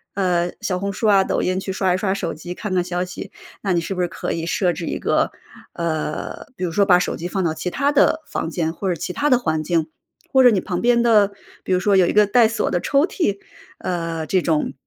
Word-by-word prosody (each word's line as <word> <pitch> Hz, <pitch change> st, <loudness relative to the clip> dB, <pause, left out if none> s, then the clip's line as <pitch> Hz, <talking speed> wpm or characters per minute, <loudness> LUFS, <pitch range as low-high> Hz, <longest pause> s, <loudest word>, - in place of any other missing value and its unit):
呃， 180 Hz, -3 st, +1 dB
小 185 Hz, -2 st, -1 dB
红 200 Hz, +1 st, -2 dB
书 205 Hz, +3 st, -1 dB
啊、 200 Hz, -2 st, +5 dB
抖 -, -, -1 dB
音， 185 Hz, +1 st, 0 dB
去 190 Hz, -, -4 dB
刷 190 Hz, -1 st, +1 dB
一 -, -, +1 dB
刷 190 Hz, 0 st, -1 dB
手 185 Hz, -4 st, -3 dB
机， 175 Hz, +4 st, -8 dB
看 210 Hz, -1 st, -4 dB
看 180 Hz, -1 st, +2 dB
消 180 Hz, 0 st, -2 dB
息， 180 Hz, -, -8 dB, 0.3 s
那 195 Hz, -, -1 dB
你 175 Hz, -, +2 dB
是 170 Hz, +3 st, -4 dB
不 180 Hz, -, -2 dB
是 175 Hz, -, +1 dB
可 -, -, -5 dB
以 165 Hz, 0 st, -3 dB
设 175 Hz, 0 st, +1 dB
置 170 Hz, -, -5 dB
一 -, -, -2 dB
个 -, -, +1 dB, 0.4 s
呃， 155 Hz, -2 st, -3 dB
比 -, -, -5 dB
如 170 Hz, -, -3 dB
说 200 Hz, +4 st, +3 dB
把 180 Hz, -3 st, +7 dB
手 -, -, -2 dB
机 170 Hz, -, -5 dB
放 190 Hz, +1 st, -2 dB
到 165 Hz, -2 st, 0 dB
其 180 Hz, -, -4 dB
他 280 Hz, +9 st, +1 dB
的 295 Hz, +2 st, +3 dB
房 -, -, -3 dB
间 165 Hz, -1 st, -2 dB
或 190 Hz, +2 st, -3 dB
者 180 Hz, -, 0 dB
其 175 Hz, +3 st, -5 dB
他 290 Hz, +7 st, 0 dB
的 255 Hz, -, +5 dB
环 160 Hz, -8 st, -1 dB
境， 160 Hz, 0 st, 0 dB, 0.5 s
或 265 Hz, -1 st, +6 dB
者 250 Hz, -, +8 dB
你 210 Hz, -5 st, +2 dB
旁 180 Hz, -2 st, -3 dB
边 235 Hz, 0 st, +3 dB
的 210 Hz, -4 st, +4 dB, 0.3 s
比 -, -, -5 dB
如 180 Hz, -, +3 dB
说 200 Hz, +2 st, +2 dB
有 185 Hz, -2 st, +5 dB
一 -, -, +1 dB
个 210 Hz, 0 st, +5 dB
带 225 Hz, +3 st, +4 dB
锁 220 Hz, -1 st, -1 dB
的 175 Hz, -, 0 dB
抽 280 Hz, +2 st, +3 dB
屉， 330 Hz, -, -1 dB, 0.4 s
呃， 165 Hz, -2 st, -3 dB
这 185 Hz, +3 st, +1 dB
种 160 Hz, -3 st, 0 dB
185 Hz, 280 characters per minute, -21 LUFS, 170-205 Hz, 0.5 s, 者